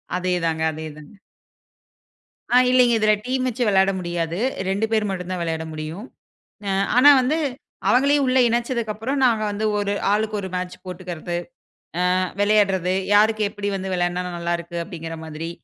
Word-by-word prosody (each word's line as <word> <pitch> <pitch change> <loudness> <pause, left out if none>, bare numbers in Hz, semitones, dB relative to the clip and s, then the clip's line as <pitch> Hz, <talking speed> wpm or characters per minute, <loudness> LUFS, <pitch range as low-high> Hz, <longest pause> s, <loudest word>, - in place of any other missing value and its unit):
அதே 180 0 0
தாங்க 160 -1 0
அதே 155 +1 -7
தாங்க. 150 +5 -13 1.4
ஆ - - +4
இல்லீங்க 250 -2 +5
இதுல 215 0 +4
டீம் 255 0 -1
வச்சு 250 0 -1
வெளாட 195 0 +4
முடியாது. 175 -1 -3 0.3
2 200 +3 +1
பேர் 215 -2 +1
மட்டும்தா 185 -1 -4
விளையாட 160 -1 -2
முடியும். 155 +8 -6 0.6
அ - - 0 0.3
ஆனா 285 +3 +8
வந்து 290 +6 +1 0.5
அவங்களையும் 280 +2 +4
உள்ள 255 +1 +3
இணச்சதுக்கப்புறம் 235 +1 -2
நாங்க 225 -3 +3
வந்து 205 +1 -3
ஒரு 205 0 -1 0.2
ஆளுக்கு 215 0 0
ஒரு 190 -1 -4
மேட்ச் 180 0 -4
போட்டுக்கிறது, 175 -2 -6 0.8
ஆ, - - +2 0.2
விளையாடுறது, 195 -3 +2 0.2
யாருக்கு 215 +1 +4
எப்படி 205 0 -5
வந்து 190 0 -4
விளையாடுனா 175 0 0
நல்லா 170 0 -2
இருக்கு 170 0 -8
அப்படிங்கிற 165 -3 -7
மாதிரி. 160 +1 -6
195 Hz, 150 wpm, -22 LUFS, 175-225 Hz, 1.4 s, ஆனா